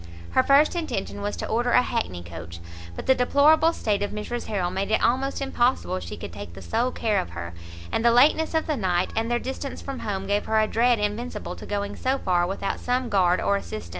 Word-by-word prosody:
Her 260 - +4
first 280 +5 +4
intention 315 - -3
was 205 0 -3
to - - -4
order 240 +2 0
a 250 - +6
hackney 155 - -3
coach, 85 0 -9 0.4
but - - -6
the 265 - +6
deplorable 290 +6 +4
state 210 -10 -1
of 205 - -1
Mrs 215 +3 -5
Harrel 185 -5 -1
made 195 +2 -2
it 220 - +2
almost 270 +3 +1
impossible 250 - 0
she 85 -2 -7
could - - -8
take 85 - -8
the 95 - -10
sole 235 - 0
care 220 -4 0
of 85 - -4
her, 85 0 -5 0.4
and 225 - 0
the 235 - +6
lateness 295 +7 +4
of 320 - +1
the 305 -3 -1
night, 185 -4 0
and 225 +1 0
their 240 - +2
distance 265 +2 -5
from 275 -1 -6
home, 195 -3 -3
gave 205 +1 0
her 220 0 +2
a 215 - +4
dread 235 +2 +3
invincible 210 +4 -3
to - - -10
going 205 0 -3
so 260 +1 0
far 175 -6 +1
without 195 +1 -3
some 250 0 -1
guard 185 -3 +3
or 200 - +2
assistant. 105 - -7
220 Hz, 225 wpm, -25 LUFS, 190-255 Hz, 0.4 s, a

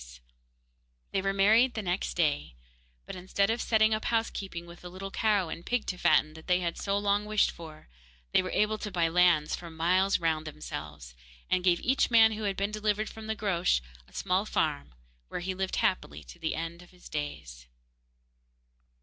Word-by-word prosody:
There - - -12 0.9
they 195 - 0
were 195 0 0
married 220 +6 +4
the 220 - -3
next 180 +1 -2
day, 145 - 0 0.5
but - - -7
instead 195 +3 0
of 230 - -1
setting 220 -1 +3
up 215 - -2
housekeeping 195 -6 -2
with 170 0 -13
the 180 - -8
little 190 +2 -7
cow 205 -6 +1
and 170 - -6
pig 245 +3 -1
to 180 - -3
fatten 155 0 +3
that 160 0 -13
they 180 -1 +3
had 170 -2 -2
so 200 0 -1
long 205 0 +1
wished 215 0 +2
for, 160 -2 -12 0.4
they - - +4
were 185 - -5
able 210 +2 +1
to 210 - -4
buy 170 -4 +1
lands 170 -3 +3
for 170 - -9
miles 180 +4 +2
round 160 -2 0
for 155 - -6
themselves, 75 - -8 0.4
and 185 -1 +2
gave 175 -2 +3
each 265 +2 +2
man 225 -2 +6
who 215 0 -4
had 195 -1 -1
been 200 +1 -1
delivered 215 0 -1
from 220 -1 -9
the 220 - -1
Groac'h 185 - +1 0.3
a - - -23
small 185 +1 0
farm, 150 - -1 0.3
where - - -5
he 185 +1 -2
lived 190 0 -2
happily 185 - -1
to 175 - -13
the 160 -1 -2
end 165 +2 -5
of 180 - -16
his 180 -1 -15
days. 60 - -6
185 Hz, 200 wpm, -29 LUFS, 165-210 Hz, 0.9 s, man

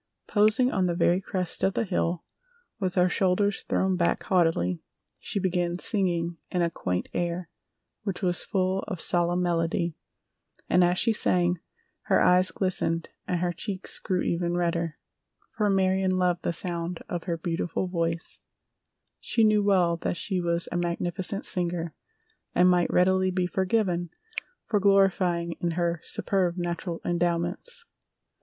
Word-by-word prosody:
Posing 215 +5 +3
on 185 -2 +1
the 175 - 0
very 175 +1 +3
crest 185 -2 -2
of 190 - +2
the - - +1
hill 175 -4 -1 0.6
with 185 -3 -1
her 180 -1 +4
shoulders 195 +2 +1
thrown 190 -1 0
back 170 -1 +1
haughtily, 165 - +1 0.4
she 200 - -2
began 175 -2 0
singing 175 -4 0
a 170 -2 +1
quaint 90 - -2
air 175 0 -2 0.5
which 195 -2 -4
was 175 -2 +1
full 185 0 0
of 185 -5 -4
solemn 175 +1 +2
melody, 170 0 0 0.7
and 180 - +4
as 175 +1 +2
she 225 - +3
sang 175 -4 +2 0.5
her - - +4
eyes 180 +1 +5
glistened 180 -3 0 0.2
and 175 -1 -1
her 175 -1 0
cheeks 190 +2 -5
grew 185 -3 -1
even 170 0 0
redder, 170 -2 -1 0.6
for 210 -2 +1
Marion 190 -1 +2
loved 180 -1 +1
the - - -1
sound 170 0 -4
of 175 -1 -4
her 170 -2 -1
beautiful 170 +2 -2
voice—she 170 +6 -4
knew 215 -1 +4
well 185 -4 +3
that 170 - -2
she 185 +3 -1
was 170 0 -1
a - - -1
magnificent 175 +3 -2
singer, 170 -2 -2 0.6
and 180 - +5
might 175 -1 +2
readily 185 +1 +3
be 185 -1 0
forgiven 185 -2 0 0.6
for 215 -3 +1
glorying 190 -3 +3
in 170 - 0
her 170 -1 0
superb 185 -3 -1
natural 175 -1 -3
endowments. 175 - -1
180 Hz, 145 wpm, -27 LUFS, 170-190 Hz, 0.7 s, eyes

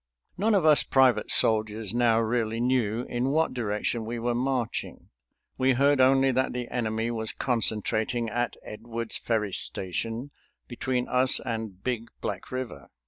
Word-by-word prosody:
None 210 +3 +2
of 185 -5 +2
us 155 -2 +7
private 130 -2 +3
soldiers 110 -1 +2
now 120 -2 +3
really 115 0 -1
knew 120 -2 0
in 125 +1 -2
what 160 +1 +1
direction 115 -1 -2
we 115 +2 -4
were 120 +1 -1
marching. 125 -1 -3 0.5
We 130 0 +3
heard 140 +2 +3
only 135 +1 +4
that 130 +1 0
the 125 -1 -4
enemy 115 -1 -1
was 110 -2 -2
concentrating 115 0 0
at 120 +2 -2
Edwards 115 +1 -4
Ferry 105 -4 -1
Station, 115 +11 -3 0.4
between 125 0 -2
us 130 +1 +3
and 110 -6 -5
Big 120 -2 -2
Black - - -5
River. 130 - -6
120 Hz, 145 wpm, -27 LUFS, 110-130 Hz, 0.5 s, us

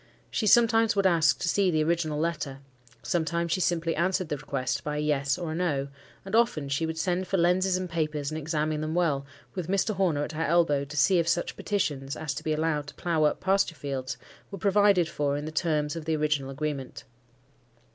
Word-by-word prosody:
She 215 - 0
sometimes 225 0 +5
would 200 -1 +1
ask 165 -4 +4
to - - -3
see 195 +1 +2
the 155 -3 +2
original 160 -2 0
letter; 155 -4 -2 0.5
sometimes 170 -1 -1
she 185 - +1
simply 165 -2 0
answered 185 0 0
the 145 - -1
request 135 -2 -3
by 150 0 -3
a - - -1
"Yes," 140 -2 0
or 170 -3 -4
a - - -3
"No;" 145 -6 -1 0.4
and 195 +3 -2
often 225 -12 +2
she 160 +4 0
would 160 0 -4
send 180 +2 -1
for 195 - 0
lenses 180 +2 +3
and 185 0 -3
papers, 155 -3 -2
and 155 - -3
examine 155 0 -1
them 155 +1 -3
well, 145 -6 +1 0.3
with 180 -4 -4
Mr. 195 +3 +1
Horner 175 -7 +1
at 150 - -4
her 155 0 -4
elbow, 155 -3 +2
to 150 +2 -8
see 175 +6 +4
if 165 - 0
such 175 +1 0
petitions, 145 -9 -2
as 150 -2 -3
to - - -6
be 155 - -1
allowed 155 -1 0
to - - -10
plough 165 -3 +1
up 150 - +1
pasture 190 -3 +1
fields, 135 -2 -4 0.3
were 195 - -7
provided 200 -2 +3
for 145 -2 -1
in 145 - -5
the 155 - -5
terms 155 -2 0
of 165 -2 -6
the 160 -1 +1
original 150 -3 0
agreement. 140 -1 -4
160 Hz, 215 wpm, -27 LUFS, 150-180 Hz, 0.5 s, sometimes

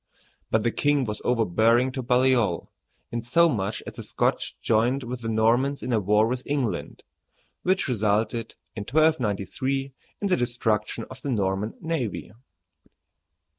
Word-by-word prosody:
But 110 -1 +2
the 120 - +2
king 145 +1 +2
was 105 -3 -4
overbearing 115 +2 +3
to 130 0 -4
Baliol, 125 -7 +2 0.4
insomuch 120 -3 +1
that - - -7
the - - -8
Scotch - - -1
joined 120 +5 +1
with 120 0 -5
the 115 - -3
Normans 120 +6 +2
in 125 - -3
war 105 +2 +4
with 125 +2 -1
England, 140 -6 -2 0.6
which 185 -1 +1
resulted, 110 -1 0 0.2
in 110 - -4
1293, 135 - 0 0.3
in 200 - +1
the 185 - +3
destruction 115 -3 -1
of 130 0 -9
the 140 - -4
Norman 100 -2 -1
navy. 160 - -3
120 Hz, 135 wpm, -25 LUFS, 110-135 Hz, 0.6 s, war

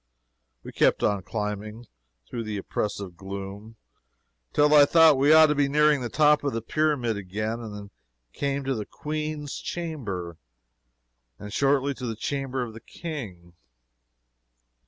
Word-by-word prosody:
We - - -8
kept - - +2
on 100 -2 +1
climbing, 105 +3 -5 0.4
through 115 -2 -5
the 105 -1 -3
oppressive 100 -2 -4
gloom, 100 +3 -8 0.8
till 150 +1 +4
I 150 -1 +9
thought 160 0 +6
we 140 +3 +4
ought 160 0 +9
to 150 - +2
be 145 -1 +1
nearing 150 -1 +3
the 120 - -3
top 150 +1 +4
of 140 - -1
the 115 - -2
pyramid 140 -7 0
again, 110 +4 -3
and 110 -3 -7
then 100 -1 -9 0.4
came 140 0 -2
to 135 0 -1
the 110 -4 -4
"Queen's 150 -1 -4
Chamber," 105 - -5 1.0
and 105 0 -9
shortly 140 +1 +2
to 125 -2 -6
the 110 - -3
Chamber 135 +2 -3
of 115 -2 -7
the 115 - -11
King. 105 - -8
125 Hz, 150 wpm, -26 LUFS, 105-145 Hz, 1.0 s, I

